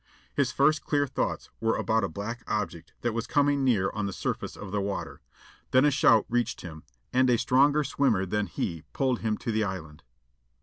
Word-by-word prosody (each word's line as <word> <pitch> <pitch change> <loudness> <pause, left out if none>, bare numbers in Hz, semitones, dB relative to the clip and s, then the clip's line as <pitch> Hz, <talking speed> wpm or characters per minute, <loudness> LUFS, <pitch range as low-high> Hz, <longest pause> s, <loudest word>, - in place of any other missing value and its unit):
His 135 -3 +1
first 140 +3 +3
clear 145 -1 +1
thoughts 135 - -3
were 115 0 +1
about 110 -1 +1
a - - +1
black 115 +4 -5
object 105 -6 -3
that 120 -2 -1
was 115 0 -3
coming 145 -1 +2
near 110 -8 +2
on 105 -1 -2
the - - -3
surface - - -4
of 100 -2 -8
the 105 0 0
water. 100 0 -4 0.5
Then 130 +3 +5
a 150 - +4
shout 115 -5 +4
reached 120 -1 -1
him, 80 -3 -9 0.3
and 130 0 +4
a 120 - +4
stronger 140 +5 +3
swimmer 130 -8 +1
than 105 +2 -1
he 85 0 -3
pulled 130 -3 +1
him 110 -1 -1
to 115 - -3
the 110 0 +1
island. 80 -6 -5
115 Hz, 200 wpm, -28 LUFS, 100-135 Hz, 0.5 s, Then